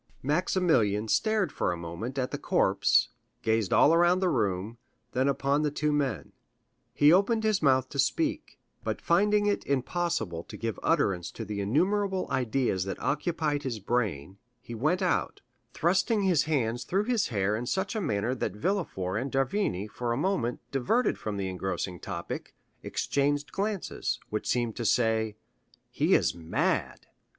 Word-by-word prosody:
Maximilian 145 Hz, -, +2 dB
stared 215 Hz, -, +1 dB
for -, -, -1 dB
a 90 Hz, -, -3 dB
moment 85 Hz, +10 st, -6 dB
at 130 Hz, -1 st, -1 dB
the -, -, -4 dB
corpse, -, -, +3 dB, 0.3 s
gazed 110 Hz, -3 st, +1 dB
all 155 Hz, -, +6 dB
around 175 Hz, +2 st, +4 dB
the 185 Hz, -1 st, +2 dB
room, 105 Hz, -, -1 dB, 0.3 s
then 130 Hz, +2 st, +1 dB
upon 140 Hz, +1 st, +1 dB
the 150 Hz, -, +1 dB
two 150 Hz, +1 st, -1 dB
men; 145 Hz, -3 st, -1 dB, 0.6 s
he 150 Hz, +2 st, +5 dB
opened 220 Hz, +4 st, +3 dB
his 215 Hz, -3 st, +2 dB
mouth 130 Hz, -3 st, +3 dB
to 140 Hz, -, -6 dB
speak, 305 Hz, -, 0 dB, 0.3 s
but -, -, -2 dB
finding 205 Hz, +4 st, +3 dB
it 205 Hz, 0 st, +1 dB
impossible 130 Hz, -, -1 dB
to -, -, -9 dB
give 115 Hz, -4 st, -3 dB
utterance 90 Hz, -3 st, +1 dB
to 115 Hz, -, -7 dB
the 100 Hz, 0 st, -3 dB
innumerable 185 Hz, -, +1 dB
ideas 125 Hz, -6 st, 0 dB
that 95 Hz, -, -4 dB
occupied 150 Hz, -1 st, -1 dB
his 130 Hz, -5 st, -3 dB
brain, 100 Hz, -, -2 dB, 0.2 s
he 120 Hz, -, -10 dB
went 155 Hz, -, 0 dB
out, 180 Hz, -, 0 dB, 0.3 s
thrusting 190 Hz, -, +1 dB
his 180 Hz, -6 st, +3 dB
hands 120 Hz, -6 st, 0 dB
through 190 Hz, +10 st, 0 dB
his 235 Hz, -2 st, +1 dB
hair 105 Hz, -2 st, 0 dB
in 120 Hz, +3 st, -4 dB
such 195 Hz, -, -1 dB
a 220 Hz, -, -1 dB
manner 110 Hz, -, 0 dB
that 120 Hz, -6 st, -3 dB
Villefort 105 Hz, -, -1 dB
and 135 Hz, +1 st, -4 dB
d'Avrigny, 135 Hz, -, 0 dB
for 120 Hz, +3 st, -4 dB
a -, -, -2 dB
moment 140 Hz, -8 st, -1 dB
diverted 140 Hz, -, +1 dB
from 105 Hz, -2 st, -4 dB
the 95 Hz, -1 st, -2 dB
engrossing 95 Hz, -1 st, -3 dB
topic, 90 Hz, -4 st, -6 dB, 0.3 s
exchanged 145 Hz, +1 st, -1 dB
glances, 200 Hz, -1 st, -2 dB
which 105 Hz, -, -3 dB
seemed 120 Hz, -3 st, 0 dB
to 120 Hz, -, -4 dB
say,—"He 110 Hz, -1 st, 0 dB
is -, -, +2 dB
mad!" 85 Hz, -1 st, -1 dB
130 Hz, 160 wpm, -28 LUFS, 105-175 Hz, 0.6 s, all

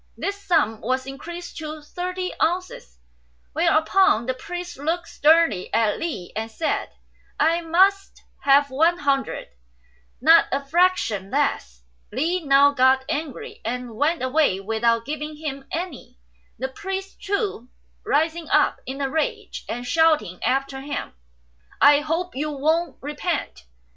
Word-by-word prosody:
This 400 Hz, 0 st, -3 dB
sum 225 Hz, -, +1 dB
was 260 Hz, +2 st, -1 dB
increased 340 Hz, +6 st, -8 dB
to 310 Hz, -1 st, -6 dB
thirty 365 Hz, +3 st, -4 dB
ounces, 345 Hz, -, -2 dB, 0.6 s
whereupon 315 Hz, -, +3 dB
the 260 Hz, -, -1 dB
priest 355 Hz, +4 st, -7 dB
looked 330 Hz, +4 st, -2 dB
sternly 305 Hz, -, +3 dB
at 220 Hz, -2 st, +2 dB
Li 285 Hz, -, -5 dB
and 220 Hz, +1 st, -3 dB
said, 310 Hz, +8 st, -2 dB, 0.5 s
"I 330 Hz, +2 st, +3 dB
must 385 Hz, +4 st, +2 dB, 0.2 s
have 280 Hz, 0 st, +4 dB
one 325 Hz, +6 st, +3 dB
hundred; 280 Hz, -3 st, -1 dB, 0.7 s
not 325 Hz, +5 st, +6 dB
a 275 Hz, +1 st, -1 dB
fraction 295 Hz, -, +1 dB
less." 65 Hz, -, -1 dB, 0.3 s
Li 330 Hz, -, -1 dB
now 280 Hz, 0 st, +5 dB
got 265 Hz, -1 st, +3 dB
angry, 295 Hz, -4 st, -5 dB
and 240 Hz, 0 st, -4 dB
went 300 Hz, +5 st, +1 dB
away 260 Hz, -7 st, +2 dB
without 225 Hz, +3 st, 0 dB
giving 300 Hz, +1 st, -5 dB
him 280 Hz, -3 st, -5 dB
any, 340 Hz, -, -5 dB, 0.4 s
the 260 Hz, -, -2 dB
priest, 385 Hz, +7 st, -6 dB
too, 395 Hz, -, -2 dB, 0.3 s
rising 320 Hz, +2 st, 0 dB
up -, -, +3 dB
in 265 Hz, +2 st, -5 dB
a 275 Hz, -, +1 dB
rage 310 Hz, +3 st, -3 dB
and 245 Hz, +1 st, -4 dB
shouting 300 Hz, -, +2 dB
after 270 Hz, 0 st, -1 dB
him, 285 Hz, +1 st, -5 dB, 0.7 s
"I 285 Hz, +1 st, +7 dB
hope 325 Hz, +3 st, -2 dB
you 300 Hz, +3 st, -2 dB
won't 310 Hz, +2 st, 0 dB
repent." 290 Hz, -, -3 dB
295 Hz, 135 wpm, -23 LUFS, 260-335 Hz, 0.7 s, I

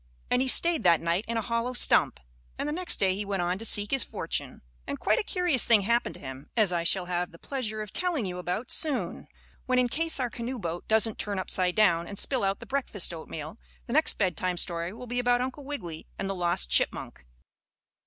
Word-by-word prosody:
And 250 Hz, -, +3 dB
he 265 Hz, -, 0 dB
stayed 335 Hz, +4 st, +5 dB
that 170 Hz, -2 st, +5 dB
night 170 Hz, +5 st, -1 dB
in 230 Hz, 0 st, -2 dB
a 225 Hz, -, -1 dB
hollow 235 Hz, +2 st, -1 dB
stump, 245 Hz, -, +3 dB, 0.4 s
and -, -, -3 dB
the 295 Hz, -, -2 dB
next 360 Hz, +2 st, -1 dB
day 190 Hz, -1 st, +3 dB
he 200 Hz, +2 st, -3 dB
went 195 Hz, -3 st, -2 dB
on 180 Hz, +2 st, -1 dB
to 225 Hz, -, -4 dB
seek 205 Hz, -1 st, +4 dB
his 270 Hz, -1 st, +2 dB
fortune. -, -, -3 dB, 0.2 s
And 140 Hz, -, -4 dB
quite -, -, +2 dB
a -, -, -1 dB
curious 355 Hz, -, +2 dB
thing 225 Hz, -3 st, +5 dB
happened 235 Hz, +4 st, 0 dB
to -, -, -13 dB
him, 130 Hz, +1 st, -9 dB
as 210 Hz, -5 st, +4 dB
I 170 Hz, -1 st, 0 dB
shall 180 Hz, +2 st, +2 dB
have 175 Hz, 0 st, -2 dB
the 170 Hz, -, -15 dB
pleasure 220 Hz, -2 st, -4 dB
of 210 Hz, -, -12 dB
telling 345 Hz, -, 0 dB
you 180 Hz, -1 st, -5 dB
about 180 Hz, +7 st, -3 dB
soon, 305 Hz, -4 st, -1 dB, 0.4 s
when 255 Hz, 0 st, +2 dB
in 250 Hz, -1 st, +3 dB
case 325 Hz, +3 st, +1 dB
our 245 Hz, -2 st, -1 dB
canoe 245 Hz, +2 st, -5 dB
boat 175 Hz, -4 st, -5 dB
doesn't 220 Hz, 0 st, +2 dB
turn 205 Hz, -1 st, -2 dB
upside 185 Hz, -1 st, 0 dB
down 170 Hz, -6 st, +3 dB
and 200 Hz, -, -8 dB
spill 255 Hz, +2 st, +1 dB
out 195 Hz, 0 st, 0 dB
the -, -, -10 dB
breakfast 255 Hz, -10 st, -1 dB
oatmeal, 160 Hz, +2 st, -8 dB, 0.3 s
the 235 Hz, -, -5 dB
next 310 Hz, +2 st, +2 dB
bedtime 185 Hz, -2 st, -1 dB
story 170 Hz, 0 st, -1 dB
will 230 Hz, +4 st, -9 dB
be 245 Hz, +1 st, -3 dB
about 245 Hz, 0 st, +2 dB
Uncle 260 Hz, +3 st, -4 dB
Wiggily 175 Hz, -, -6 dB
and 195 Hz, -, -3 dB
the 195 Hz, -, -2 dB
lost 175 Hz, -, -1 dB
chipmunk. 60 Hz, -1 st, 0 dB
210 Hz, 225 wpm, -28 LUFS, 180-250 Hz, 0.4 s, stayed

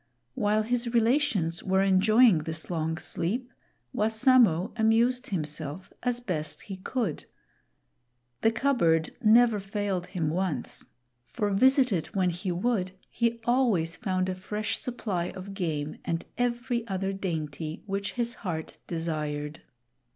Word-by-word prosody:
While 210 Hz, +5 st, +1 dB
his 240 Hz, +1 st, -1 dB
relations 225 Hz, -, +2 dB
were 190 Hz, +1 st, +2 dB
enjoying 200 Hz, +1 st, +5 dB
this 160 Hz, +2 st, -5 dB
long 160 Hz, -1 st, -1 dB
sleep, 230 Hz, +10 st, -3 dB, 0.4 s
Wassamo 220 Hz, -, +4 dB
amused 235 Hz, +3 st, +3 dB
himself 155 Hz, -1 st, -4 dB
as 245 Hz, -1 st, 0 dB
best 170 Hz, -10 st, -3 dB
he 195 Hz, -2 st, -7 dB
could. 195 Hz, -, -3 dB, 1.2 s
The 225 Hz, -, +4 dB
cupboard 220 Hz, -, +2 dB
never 225 Hz, 0 st, +5 dB
failed 195 Hz, -2 st, -2 dB
him 160 Hz, -5 st, -1 dB
once; 175 Hz, -7 st, -2 dB, 0.4 s
for 205 Hz, -, -1 dB
visit 260 Hz, +5 st, +4 dB
it 165 Hz, +3 st, -3 dB
when 185 Hz, -2 st, +2 dB
he 175 Hz, +2 st, -4 dB
i -, -, +1 dB
would, 185 Hz, -1 st, 0 dB, 0.2 s
he 235 Hz, 0 st, 0 dB
always 225 Hz, -10 st, +2 dB
found 185 Hz, -2 st, -1 dB
a 185 Hz, -, -1 dB
fresh 210 Hz, +3 st, -3 dB
supply 200 Hz, -8 st, -2 dB
of 190 Hz, +1 st, -7 dB
game 155 Hz, -6 st, -3 dB
and 165 Hz, 0 st, -2 dB
every 240 Hz, -1 st, -1 dB
other 195 Hz, -1 st, -2 dB
dainty 160 Hz, -4 st, -4 dB
which 200 Hz, 0 st, -3 dB
his 240 Hz, -1 st, -1 dB
heart 165 Hz, -6 st, -4 dB
desired. 155 Hz, -2 st, -3 dB
195 Hz, 130 wpm, -28 LUFS, 165-235 Hz, 1.2 s, enjoying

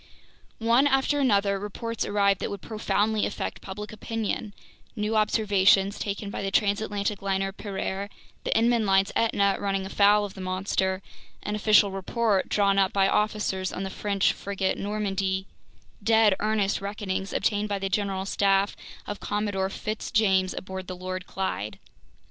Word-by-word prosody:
One 235 Hz, +5 st, +4 dB
after 275 Hz, +1 st, +2 dB
another, 200 Hz, -6 st, +2 dB
reports 225 Hz, +3 st, -4 dB
arrived 200 Hz, -1 st, +2 dB
that -, -, -2 dB
would 200 Hz, -2 st, -6 dB
profoundly 215 Hz, -1 st, 0 dB
affect -, -, -5 dB
public 210 Hz, +2 st, -7 dB
opinion: 215 Hz, -1 st, -3 dB, 0.4 s
new 215 Hz, 0 st, -1 dB
observations 205 Hz, -2 st, +3 dB
taken 200 Hz, 0 st, -4 dB
by -, -, -4 dB
the 195 Hz, -, -1 dB
transatlantic 205 Hz, 0 st, 0 dB
liner 195 Hz, 0 st, 0 dB
Pereire, 195 Hz, 0 st, -4 dB, 0.3 s
the -, -, -2 dB
Inman 230 Hz, -1 st, +3 dB
line's 195 Hz, 0 st, +3 dB
Etna 200 Hz, -3 st, +2 dB
running 195 Hz, -1 st, -1 dB
afoul 205 Hz, +1 st, +4 dB
of 200 Hz, -, -8 dB
the 190 Hz, -, -9 dB
monster, 190 Hz, 0 st, -1 dB, 0.4 s
an 210 Hz, -, -3 dB
official 210 Hz, -1 st, +4 dB
report 195 Hz, +1 st, 0 dB
drawn 200 Hz, -1 st, +3 dB
up 190 Hz, -1 st, +3 dB
by 195 Hz, -1 st, +3 dB
officers 210 Hz, -3 st, 0 dB
on 190 Hz, -, -4 dB
the 190 Hz, -, -4 dB
French 200 Hz, 0 st, +1 dB
frigate 195 Hz, -1 st, -2 dB
Normandy, 195 Hz, -2 st, -1 dB, 0.6 s
dead 220 Hz, -1 st, +5 dB
earnest 210 Hz, -2 st, 0 dB
reckonings 200 Hz, -1 st, -3 dB
obtained 210 Hz, 0 st, 0 dB
by 200 Hz, -, 0 dB
the 195 Hz, 0 st, -2 dB
general 195 Hz, 0 st, -1 dB
staff 195 Hz, 0 st, +2 dB, 0.3 s
of 205 Hz, -, -5 dB
Commodore 205 Hz, -2 st, -1 dB
Fitz 215 Hz, +2 st, -4 dB
James 190 Hz, -4 st, +2 dB
aboard 190 Hz, 0 st, -6 dB
the 185 Hz, -, -5 dB
Lord 185 Hz, 0 st, -5 dB
Clyde. 150 Hz, -, -3 dB
200 Hz, 150 wpm, -26 LUFS, 195-210 Hz, 0.6 s, dead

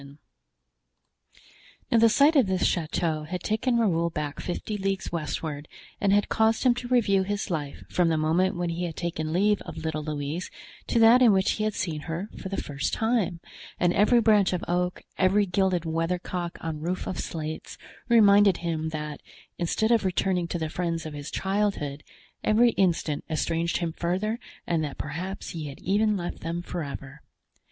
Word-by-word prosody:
Now 230 Hz, -, +5 dB
the 230 Hz, 0 st, +6 dB
sight 285 Hz, +7 st, +5 dB
of 265 Hz, -8 st, +5 dB
this 185 Hz, -1 st, +1 dB
chateau 160 Hz, -2 st, 0 dB
had 180 Hz, +3 st, -5 dB
taken 235 Hz, +3 st, +1 dB
Raoul 170 Hz, -7 st, +2 dB
back 150 Hz, -2 st, -4 dB
fifty 195 Hz, +4 st, -4 dB
leagues 195 Hz, -1 st, -2 dB
westward 155 Hz, -2 st, -4 dB, 0.3 s
and 200 Hz, -, +2 dB
had 205 Hz, 0 st, +3 dB
caused 220 Hz, 0 st, +2 dB
him 250 Hz, -2 st, +5 dB
to 245 Hz, 0 st, -6 dB
review 215 Hz, -6 st, +3 dB
his 205 Hz, +1 st, -3 dB
life 145 Hz, -4 st, -4 dB
from 175 Hz, -2 st, +2 dB
the 160 Hz, -, +1 dB
moment 165 Hz, +5 st, +2 dB
when 175 Hz, -1 st, -1 dB
he 175 Hz, +2 st, -2 dB
had 165 Hz, -3 st, -5 dB
taken 160 Hz, -2 st, -3 dB
leave 205 Hz, +4 st, +2 dB
of 165 Hz, -2 st, -8 dB
little 160 Hz, -1 st, -3 dB
Louise 150 Hz, +3 st, -4 dB, 0.4 s
to -, -, 0 dB
that 230 Hz, +2 st, +7 dB
in 240 Hz, -3 st, +7 dB
which 190 Hz, 0 st, +3 dB
he 215 Hz, -, -1 dB
had 215 Hz, -, -1 dB
seen 160 Hz, -4 st, -2 dB
her 175 Hz, +6 st, -4 dB
for 190 Hz, -, -7 dB
the 195 Hz, -, -3 dB
first 140 Hz, -1 st, -3 dB
time; 220 Hz, -7 st, 0 dB, 0.4 s
and 175 Hz, 0 st, +3 dB
every 225 Hz, +4 st, +4 dB
branch 210 Hz, -5 st, +4 dB
of 180 Hz, -, -2 dB
oak, 180 Hz, +1 st, -1 dB, 0.2 s
every 195 Hz, +2 st, +4 dB
gilded 185 Hz, -2 st, +1 dB
weathercock 170 Hz, +2 st, -2 dB
on 160 Hz, -2 st, -4 dB
roof 180 Hz, +3 st, -2 dB
of 185 Hz, -, -4 dB
slates, 155 Hz, -1 st, -5 dB, 0.3 s
reminded 205 Hz, -4 st, +6 dB
him 160 Hz, -2 st, -2 dB
that, 150 Hz, -1 st, -5 dB, 0.4 s
instead 220 Hz, +6 st, +1 dB
of 230 Hz, -2 st, +4 dB
returning 185 Hz, -1 st, 0 dB
to 175 Hz, -, -3 dB
the 160 Hz, -1 st, -2 dB
friends 170 Hz, -1 st, -2 dB
of 155 Hz, -, -6 dB
his 145 Hz, 0 st, -6 dB
childhood, 190 Hz, -8 st, -1 dB, 0.4 s
every 230 Hz, +3 st, +4 dB
instant 170 Hz, -7 st, 0 dB
estranged 165 Hz, +1 st, 0 dB
him 170 Hz, -3 st, -2 dB
further 190 Hz, +7 st, -1 dB, 0.3 s
and 165 Hz, -2 st, 0 dB
that 145 Hz, -2 st, -5 dB
perhaps 175 Hz, +7 st, -5 dB
he 160 Hz, -3 st, -5 dB
had 140 Hz, -, -9 dB
even 210 Hz, +2 st, +2 dB
left 175 Hz, -1 st, -5 dB
them 170 Hz, +1 st, -4 dB
forever. 145 Hz, -4 st, -6 dB
180 Hz, 180 wpm, -26 LUFS, 160-205 Hz, 0.4 s, that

